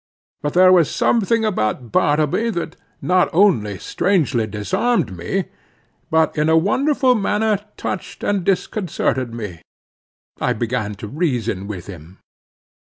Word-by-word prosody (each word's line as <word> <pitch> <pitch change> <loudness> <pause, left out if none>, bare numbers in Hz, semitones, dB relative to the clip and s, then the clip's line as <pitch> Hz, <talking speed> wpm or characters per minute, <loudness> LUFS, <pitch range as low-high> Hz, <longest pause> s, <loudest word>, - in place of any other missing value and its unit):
But 145 +2 -3
there 185 +1 +7
was 175 -5 +5
something 230 0 +1
about 120 - -1
Bartleby 150 - +2
that 170 0 -4 0.3
not 180 0 +3
only 160 - +3
strangely 155 - 0
disarmed 105 - -1
me, 85 0 -2 0.6
but 160 0 +2
in 155 0 +1
a 160 - +5
wonderful 260 - +2
manner 210 -1 +1 0.2
touched 185 - -5
and 200 -3 0
disconcerted 175 - -1
me. 105 -8 -7 0.8
I 125 - +1
began 110 -2 -2
to 105 - -8
reason 120 - -2
with 95 -4 -6
him. 90 -1 -11
155 Hz, 125 wpm, -20 LUFS, -, 0.8 s, there